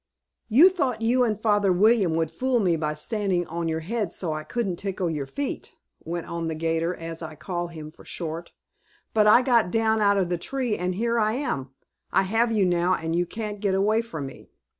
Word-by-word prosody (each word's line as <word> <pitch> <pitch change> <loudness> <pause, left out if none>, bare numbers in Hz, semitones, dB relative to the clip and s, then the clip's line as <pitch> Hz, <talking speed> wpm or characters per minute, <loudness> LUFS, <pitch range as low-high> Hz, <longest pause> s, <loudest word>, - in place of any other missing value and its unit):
"You 285 - +8
thought 255 -11 -1
you 250 +3 +3
and 215 -4 0
Father 205 -3 +3
William 195 -2 +4
would 160 -1 0
fool 255 -1 0
me 180 -5 +2
by 150 -1 -2
standing 185 +1 -1
on 170 +1 -3
your 160 0 -1
heads 205 +2 -2
so 165 -4 -1
I 155 0 -4
couldn't 200 -3 -2
tickle 185 -3 -2
your 145 -3 -3
feet," 280 - -5 0.3
went 170 +1 -4
on 170 -1 -4
the 160 - -2
'gator, 165 +2 -1
as 165 0 -7
I 155 -1 -7
call 175 +3 -4
him 155 -2 -9
for - - -17
short. 165 0 -5 0.6
"But 215 -1 +4
I 235 +4 +7
got 235 -6 +3
down 220 +2 +2
out 200 -1 +4
of 185 -3 +1
the 175 -1 -1
tree, 250 +2 -1
and 180 -1 -2
here 235 +3 0
I 215 0 +2
am. 185 - -2 0.4
I 190 - +3
have 225 +4 +1
you 210 -4 +3
now 180 +1 +2
and 165 +1 -3
you 175 0 +1
can't 210 0 -5
get 200 -2 +1
away 215 +3 +2
from 160 -11 -6
me!" 135 - -11
190 Hz, 215 wpm, -25 LUFS, 165-225 Hz, 0.6 s, You